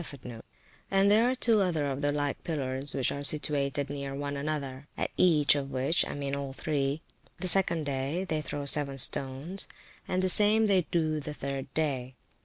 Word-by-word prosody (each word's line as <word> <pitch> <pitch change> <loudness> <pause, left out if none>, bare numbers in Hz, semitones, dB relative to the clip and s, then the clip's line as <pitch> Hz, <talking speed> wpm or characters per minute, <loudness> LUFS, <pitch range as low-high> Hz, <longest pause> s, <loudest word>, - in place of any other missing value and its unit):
[FN#38] 125 -7 -10 0.5
And 195 +1 +3
there 225 +4 +4
are 255 - 0
two 230 -4 +2
other 165 -6 0
of 140 0 -3
the 145 0 +1
like 145 -1 -3
pillars, 135 -4 -2
which 135 -2 0
are 140 - -5
situated 145 -1 -1
near 140 -1 -6
one 145 0 -4
another; 140 -2 -5
at - - -2
each 155 -5 +4
of 140 -1 -3
which 135 +7 -1
[p.377] - - -1
(I - - -6
mean 140 -1 -3
all 140 -1 -5
three), 140 0 -2 0.4
the 185 - -1
second 170 -4 +4
day, 140 +6 -2
they 155 -2 -2
throw 145 -1 -5
seven 140 -1 +5
stones; 135 +8 0 0.4
and 185 0 -1
the - - +2
same 210 +3 +6
they 190 -5 +2
do 155 -3 0
the 150 +1 -7
third 135 -1 -5
day. 130 -5 -2
145 Hz, 195 wpm, -28 LUFS, 140-170 Hz, 0.5 s, same